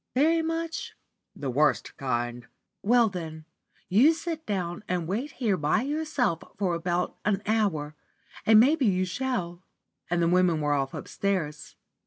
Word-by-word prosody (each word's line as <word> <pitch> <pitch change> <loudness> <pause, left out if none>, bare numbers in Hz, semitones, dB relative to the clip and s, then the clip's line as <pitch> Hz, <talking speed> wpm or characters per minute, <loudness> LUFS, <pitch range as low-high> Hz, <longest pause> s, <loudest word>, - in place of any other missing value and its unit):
"Very 320 +5 +4
much?" 330 0 -3 0.4
"The 140 -2 -3
worst 150 +4 +1
kind." 120 -2 -3 0.3
"Well, 235 +2 +4
then, 160 -5 -6 0.4
you 260 - +5
sit 325 -1 -5
down 185 -2 -2
and 175 -2 -1
wait 235 - -3
here 215 -7 0
by 150 +9 +1
yourself 280 - 0 0.2
for 190 -3 0
about 175 +1 -1
an 205 -1 0
hour, 180 -9 0 0.5
and 220 -1 +7
maybe 275 +2 +4
you 185 -2 +2
shall;" 185 -6 -3 0.5
and 175 0 +1
the 170 - +3
women 175 -2 +3
were 145 -1 +1
off 135 -1 -1
upstairs. 175 -7 -3
185 Hz, 145 wpm, -27 LUFS, 160-245 Hz, 0.5 s, and